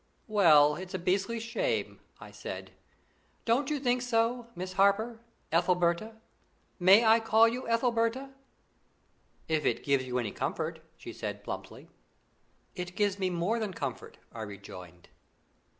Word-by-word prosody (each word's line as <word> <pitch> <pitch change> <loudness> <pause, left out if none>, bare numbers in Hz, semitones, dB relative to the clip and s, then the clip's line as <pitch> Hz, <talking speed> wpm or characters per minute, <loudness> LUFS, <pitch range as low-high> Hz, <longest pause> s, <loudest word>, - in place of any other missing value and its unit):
"Well, 155 -8 +5
it's 185 +1 -7
a - - 0
beastly 195 +6 0
shame," 460 - -2 0.2
I - - -11
said. - - -7 0.7
"Don't 250 +5 +2
you 300 -1 -1
think 250 -2 +1
so, 235 0 0
Miss 185 +1 -5
Harper 200 +4 +2 0.3
Ethelberta? 175 +5 +1 0.6
May 195 +6 +6
I 225 +1 +6
call 225 0 +5
you 245 +2 -3
Ethelberta?" 235 +2 0 1.2
"If 155 -1 0
it - - 0
gives 140 -2 +2
you 125 0 -2
any 115 -5 -2
comfort," - - -3 0.2
she - - -9
said - - -6
plumply. - - -7 0.9
"It 180 0 -6
gives 205 -1 0
me 190 -1 0
more 180 +6 -1
than 210 -5 -4
comfort," 135 -4 -5 0.2
I 115 - -7
rejoined. 90 -4 -10
200 Hz, 135 wpm, -30 LUFS, 170-230 Hz, 1.2 s, May